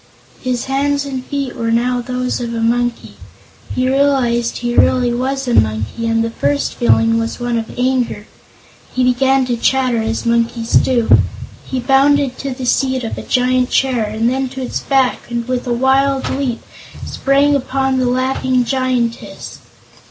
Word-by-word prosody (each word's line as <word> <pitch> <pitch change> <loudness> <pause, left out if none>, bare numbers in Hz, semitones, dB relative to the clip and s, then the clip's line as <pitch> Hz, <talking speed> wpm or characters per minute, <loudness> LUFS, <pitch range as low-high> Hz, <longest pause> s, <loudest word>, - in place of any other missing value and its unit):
His 250 -2 -2
hands 280 +1 0
and 265 -2 -5
feet 275 -2 -4
were 230 0 -2
now 245 +2 +1
those 250 0 -2
of 235 -1 -4
a - - -2
monkey. 240 +1 -1 0.6
He 255 0 +1
realized 260 -4 +1
he 240 0 -2
really 250 -2 +3
was 265 +2 -2
a 245 - 0
monkey, 110 - 0
and 225 0 +1
his 230 0 -3
first 285 +4 -1
feeling 225 -1 +2
was 230 +2 -3
one 240 -1 -2
of 225 - -8
anger. 250 -4 0 0.7
He 255 - 0
began 260 +1 +2
to 245 -1 -1
chatter 250 -1 +1
as 225 +1 -2
monkeys 235 0 0
do. 240 -3 +4 0.5
He 260 - -2
bounded 270 +1 +2
to 275 - -4
the 255 0 -5
seat 260 0 +1
of 225 - -4
a - - -6
giant 250 0 +1
chair, 255 -4 +1
and 220 +2 -1
then 260 +1 0
to 265 0 -6
its 250 - -3
back 265 -3 0
and 235 0 -3
with 255 -1 -2
a - - -1
wild 265 +2 +2
leap 265 -4 -2 0.4
sprang 280 +1 +2
upon 265 -1 0
the 255 - +1
laughing 255 0 0
Giantess. 255 -3 -2
250 Hz, 165 wpm, -17 LUFS, 235-265 Hz, 0.7 s, do